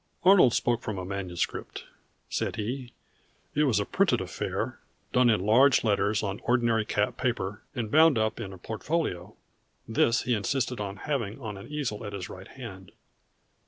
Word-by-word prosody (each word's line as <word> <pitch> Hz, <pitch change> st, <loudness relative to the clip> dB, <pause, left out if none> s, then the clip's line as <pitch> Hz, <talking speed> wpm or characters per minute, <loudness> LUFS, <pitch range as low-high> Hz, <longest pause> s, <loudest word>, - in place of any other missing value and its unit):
"Arnold 180 Hz, -, +7 dB
spoke 120 Hz, -1 st, +1 dB
from 105 Hz, -3 st, -4 dB
a 90 Hz, -, -4 dB
manuscript," 95 Hz, -2 st, -4 dB, 0.4 s
said -, -, -2 dB
he. 120 Hz, +3 st, -4 dB, 0.6 s
"It 150 Hz, +1 st, +3 dB
was 125 Hz, -7 st, +3 dB
a 100 Hz, -, 0 dB
printed -, -, +2 dB
affair, -, -, -3 dB, 0.3 s
done 125 Hz, -1 st, +5 dB
in 110 Hz, -4 st, +3 dB
large 125 Hz, +4 st, +5 dB
letters 105 Hz, -1 st, +1 dB
on 100 Hz, 0 st, -3 dB
ordinary 120 Hz, -3 st, +2 dB
cap 105 Hz, -1 st, 0 dB
paper, 105 Hz, -4 st, -2 dB
and 115 Hz, -4 st, -3 dB
bound 160 Hz, -3 st, +6 dB
up 110 Hz, +1 st, 0 dB
in 100 Hz, -5 st, -5 dB
a 95 Hz, -, -9 dB
portfolio. 110 Hz, -, -3 dB, 0.5 s
This 115 Hz, +2 st, +2 dB
he 125 Hz, -, +1 dB
insisted 125 Hz, +3 st, -1 dB
on 100 Hz, -1 st, -4 dB
having 125 Hz, -6 st, -2 dB
on 110 Hz, -5 st, -5 dB
an 100 Hz, -, -10 dB
easel 140 Hz, -9 st, -3 dB
at 105 Hz, -1 st, -6 dB
his 95 Hz, -2 st, -5 dB
right 95 Hz, +1 st, -10 dB
hand. 100 Hz, -8 st, -10 dB
110 Hz, 165 wpm, -28 LUFS, 100-125 Hz, 0.6 s, Arnold